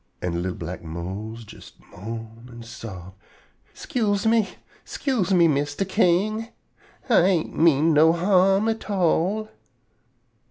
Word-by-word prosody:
An' 85 Hz, -1 st, -3 dB
li'l 90 Hz, 0 st, -3 dB
black 90 Hz, -1 st, -7 dB
Mose 95 Hz, +8 st, -7 dB
jes -, -, -14 dB, 0.2 s
moan 115 Hz, +4 st, -9 dB
an' 120 Hz, 0 st, -10 dB
sob: 105 Hz, -6 st, -9 dB, 0.6 s
"'Scuse 210 Hz, -4 st, -1 dB
me! 220 Hz, -3 st, +3 dB, 0.3 s
'Scuse 230 Hz, -, -2 dB
me, 175 Hz, -3 st, +5 dB
Mistah 145 Hz, +4 st, -1 dB
King! 205 Hz, +3 st, +1 dB, 0.6 s
Ah 240 Hz, -, +5 dB
ain't 175 Hz, -2 st, +1 dB
mean 160 Hz, 0 st, +4 dB
no 155 Hz, +2 st, +6 dB
harm 190 Hz, +4 st, +3 dB
at 225 Hz, -1 st, -3 dB
all." 195 Hz, +2 st, +1 dB
165 Hz, 120 wpm, -23 LUFS, -, 0.6 s, no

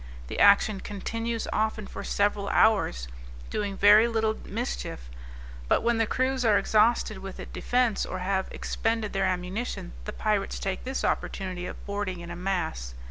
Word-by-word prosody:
The -, -, -4 dB
action 200 Hz, 0 st, +5 dB
continues 230 Hz, +3 st, -3 dB
often 215 Hz, -1 st, 0 dB
for -, -, -7 dB
several 205 Hz, 0 st, 0 dB
hours, 195 Hz, -, +3 dB, 0.4 s
doing 200 Hz, -2 st, -2 dB
very 210 Hz, +3 st, +7 dB
little 220 Hz, -1 st, +1 dB
mischief; -, -, -4 dB, 0.6 s
but -, -, +2 dB
when 235 Hz, 0 st, +2 dB
the 225 Hz, -, +2 dB
crew 260 Hz, +3 st, +1 dB
are 215 Hz, -3 st, +5 dB
exhausted 215 Hz, -1 st, +2 dB
with 195 Hz, 0 st, -8 dB
the -, -, -6 dB
defence, 245 Hz, -4 st, 0 dB
or 185 Hz, -, -4 dB
have 190 Hz, +1 st, -1 dB
expended 225 Hz, -1 st, -2 dB
their 195 Hz, -1 st, +1 dB
ammunition, 185 Hz, -, -3 dB
the -, -, -5 dB
pirates 210 Hz, -2 st, 0 dB
take 195 Hz, +3 st, -3 dB
this 265 Hz, +1 st, -2 dB
opportunity 185 Hz, -2 st, -2 dB
of -, -, -9 dB
boarding 200 Hz, -3 st, -3 dB
in 170 Hz, 0 st, -8 dB
a -, -, -5 dB
mass. 170 Hz, -, -3 dB
205 Hz, 160 wpm, -27 LUFS, 185-220 Hz, 0.6 s, very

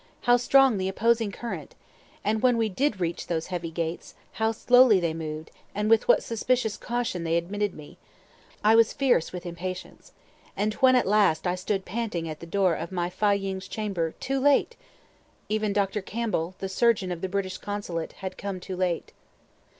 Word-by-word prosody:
how 245 Hz, -, +5 dB
strong 255 Hz, -2 st, +4 dB
the 190 Hz, 0 st, -1 dB
opposing 225 Hz, +2 st, +1 dB
current! 195 Hz, -10 st, -7 dB, 0.5 s
And 215 Hz, +1 st, 0 dB
when 250 Hz, -2 st, +4 dB
we 225 Hz, -1 st, +1 dB
did 225 Hz, 0 st, 0 dB
reach 170 Hz, -1 st, -2 dB
those 165 Hz, -2 st, -1 dB
heavy 175 Hz, -2 st, -3 dB
gates, 165 Hz, +1 st, -4 dB, 0.2 s
how 220 Hz, 0 st, 0 dB
slowly 245 Hz, -2 st, +5 dB
they 170 Hz, -2 st, -1 dB
moved, 155 Hz, -1 st, -6 dB, 0.2 s
with 215 Hz, +2 st, +3 dB
what -, -, +5 dB
suspicious 230 Hz, -1 st, 0 dB
caution 240 Hz, -7 st, -3 dB
they 165 Hz, 0 st, +1 dB
admitted 205 Hz, +4 st, -2 dB
me! 150 Hz, -1 st, -12 dB, 0.6 s
I 215 Hz, +1 st, +6 dB
was 225 Hz, 0 st, +5 dB
fierce 250 Hz, -, +2 dB
with 180 Hz, 0 st, -7 dB
impatience. 180 Hz, +1 st, -7 dB, 0.5 s
And 210 Hz, +2 st, 0 dB
when 260 Hz, -1 st, +5 dB
at 250 Hz, -, +3 dB
last 195 Hz, -6 st, +3 dB
I 180 Hz, -, +1 dB
stood 190 Hz, +1 st, -2 dB
panting 205 Hz, -5 st, -3 dB
at 155 Hz, -1 st, -6 dB
the 170 Hz, -, -9 dB
door 190 Hz, 0 st, +2 dB
of 170 Hz, -, -5 dB
my 175 Hz, -1 st, -2 dB
Fâ 200 Hz, +1 st, +2 dB
ying's 190 Hz, -1 st, -4 dB
chamber 190 Hz, -7 st, -3 dB
too 270 Hz, 0 st, -1 dB
late! 285 Hz, -, +3 dB, 0.7 s
even 215 Hz, -1 st, 0 dB
Dr. 200 Hz, 0 st, 0 dB
Campbell 190 Hz, -5 st, -2 dB
(the 195 Hz, -, -4 dB
surgeon 200 Hz, -1 st, +2 dB
of 170 Hz, -1 st, -5 dB
the 190 Hz, -, -2 dB
British 185 Hz, -1 st, -3 dB
consulate) 205 Hz, -5 st, -4 dB
had 190 Hz, -1 st, -7 dB
come 195 Hz, -2 st, -4 dB
too 185 Hz, +1 st, -6 dB
late. 180 Hz, -2 st, -2 dB
195 Hz, 180 wpm, -26 LUFS, 175-225 Hz, 0.7 s, I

